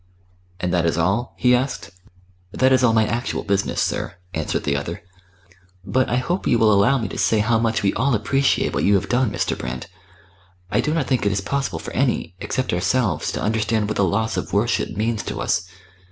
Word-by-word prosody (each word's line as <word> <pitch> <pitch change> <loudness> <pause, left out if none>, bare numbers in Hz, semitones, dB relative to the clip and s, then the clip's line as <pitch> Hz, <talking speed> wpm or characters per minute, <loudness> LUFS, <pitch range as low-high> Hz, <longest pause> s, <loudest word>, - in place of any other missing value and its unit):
"And 90 -3 -1
that 85 -2 +2
is 85 - 0
all?" 95 +9 0
he 125 -1 +4
asked. 125 -5 -1 0.6
"That 130 +5 +2
is 130 -1 +3
all 120 - +5
my 110 -1 +3
actual 115 +4 -2
business, 100 0 0
sir," - - -1 0.2
answered 80 -2 -2
the 70 - 0
other. 70 +4 -4 0.8
"But 130 +4 +1
I - - +1
hope 175 +9 -1
you - - +4
will 110 -2 +4
allow 100 +8 +4
me 115 -4 -2
to - - -6
say 110 - +3
how 110 +2 +2
much 115 -2 0
we 100 - +2
all 130 +3 +1
appreciate 135 +6 +1
what - - 0
you 100 - +4
have 95 - -1
done, 125 -1 +2
Mr. 105 - -1
Brand. 65 0 -5 0.9
I - - +2
do 150 - -1
not 160 -5 0
think 125 0 0
it - - +2
is 100 0 -1
possible 140 +7 -2
for - - -7
any, 125 -10 0
except 130 -6 -2
ourselves, 95 - 0
to - - -3
understand 110 0 0
what 110 - -3
the - - +3
loss 105 +5 0
of - - -4
worship - - +1
means 110 +1 -1
to - - -5
us. 90 +2 -1
110 Hz, 210 wpm, -22 LUFS, 100-125 Hz, 0.9 s, all